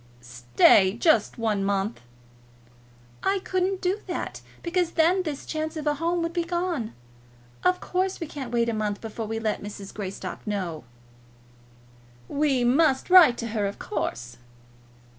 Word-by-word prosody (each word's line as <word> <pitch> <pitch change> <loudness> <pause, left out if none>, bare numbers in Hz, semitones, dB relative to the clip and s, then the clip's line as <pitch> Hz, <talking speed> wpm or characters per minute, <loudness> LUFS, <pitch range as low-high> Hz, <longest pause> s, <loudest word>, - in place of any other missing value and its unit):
"Stay 125 - +4
just 240 - +2
one 215 -4 0
month." 200 - -1 1.2
"I 390 +1 +1
couldn't 375 +1 -1
do 375 +3 0
that, 355 - -4 0.2
because 350 0 0
then 345 +3 +3
this 305 -6 -5
chance 315 +1 -3
of 310 - -5
a 295 - +2
home 335 +3 -1
would 335 0 -3
be 345 -1 0
gone. 345 - -2 0.7
Of 365 0 +3
course, 370 +1 -1
we 330 - -3
can't 275 -5 -7
wait 235 -1 +1
a 230 - 0
month 210 -2 -2
before 225 0 -6
we 225 +1 -3
let 220 -2 -2
Mrs. 200 -1 -8
Greystock 200 +1 -6
know." 180 -7 -3 1.4
"We 280 -4 +1
must 270 +5 +2
write 335 -10 +8
to 230 - -4
her, 210 -2 -1
of 200 - -6
course." 120 - -4
260 Hz, 150 wpm, -26 LUFS, 210-340 Hz, 1.4 s, write